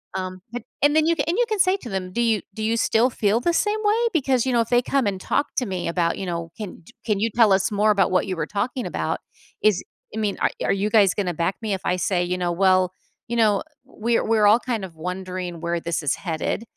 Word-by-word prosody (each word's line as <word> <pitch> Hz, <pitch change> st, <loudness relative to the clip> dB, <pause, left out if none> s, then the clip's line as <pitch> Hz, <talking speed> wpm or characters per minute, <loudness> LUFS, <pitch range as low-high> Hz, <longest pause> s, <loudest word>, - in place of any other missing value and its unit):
Um, 185 Hz, 0 st, -4 dB
but 245 Hz, +1 st, -5 dB, 0.2 s
and 290 Hz, +1 st, +4 dB
then 315 Hz, 0 st, +4 dB
you 335 Hz, -, +3 dB
and 335 Hz, -, 0 dB
you 485 Hz, -, +3 dB
say 375 Hz, +1 st, +4 dB
to 250 Hz, -, -9 dB
them, 190 Hz, -2 st, -4 dB
"Do 235 Hz, -, 0 dB
you 225 Hz, -3 st, +2 dB
do 215 Hz, -, -5 dB
you 225 Hz, +1 st, +1 dB
still 225 Hz, +2 st, +3 dB
feel 215 Hz, -2 st, +1 dB
the 345 Hz, -, +1 dB
same 420 Hz, +5 st, +1 dB
way? 445 Hz, +3 st, +2 dB
Because 265 Hz, -6 st, +1 dB
you 260 Hz, -, 0 dB
know, 235 Hz, -, +4 dB
if 230 Hz, -, -3 dB
they 245 Hz, 0 st, +4 dB
come 265 Hz, -2 st, 0 dB
and 195 Hz, -2 st, -2 dB
talk 285 Hz, -, 0 dB
to 255 Hz, -, +1 dB
me 185 Hz, -2 st, -3 dB
about" 170 Hz, 0 st, 0 dB
you 195 Hz, -, -3 dB
know, 170 Hz, -1 st, -4 dB
"'Can 210 Hz, -4 st, -6 dB
y -, -, -16 dB
can 210 Hz, -3 st, 0 dB
you 225 Hz, +3 st, +1 dB
tell 225 Hz, -3 st, +5 dB
us 190 Hz, +1 st, +1 dB
more 210 Hz, +1 st, +3 dB
about 195 Hz, -3 st, +2 dB
what 185 Hz, +1 st, +2 dB
you 185 Hz, -, -2 dB
were 165 Hz, -, -1 dB
talking 235 Hz, +6 st, -2 dB
about?' -, -, -2 dB, 0.4 s
Is 210 Hz, -3 st, +3 dB, 0.3 s
I -, -, -2 dB
mean, 210 Hz, -2 st, -1 dB
are -, -, +2 dB
are -, -, +2 dB
you 200 Hz, +2 st, 0 dB
guys 205 Hz, -4 st, +5 dB
gonna 185 Hz, -4 st, -1 dB
back 170 Hz, +4 st, 0 dB
me 215 Hz, -3 st, -2 dB
if 190 Hz, -, -3 dB
I 180 Hz, -, +1 dB
say," 180 Hz, 0 st, 0 dB
you 180 Hz, +1 st, -2 dB
know, 175 Hz, -1 st, -1 dB
"'Well, 185 Hz, 0 st, +3 dB, 0.3 s
you 235 Hz, -, -3 dB
know, 210 Hz, -3 st, +3 dB, 0.2 s
we're 235 Hz, -2 st, -1 dB
we're 220 Hz, -2 st, +4 dB
all 215 Hz, +3 st, +6 dB
kind 235 Hz, -6 st, -3 dB
of 170 Hz, -, -13 dB
wondering 180 Hz, 0 st, -5 dB
where 170 Hz, 0 st, -1 dB
this 170 Hz, 0 st, -2 dB
is 145 Hz, -, +1 dB
headed,'" 170 Hz, +5 st, -3 dB
205 Hz, 260 wpm, -23 LUFS, 185-235 Hz, 0.4 s, all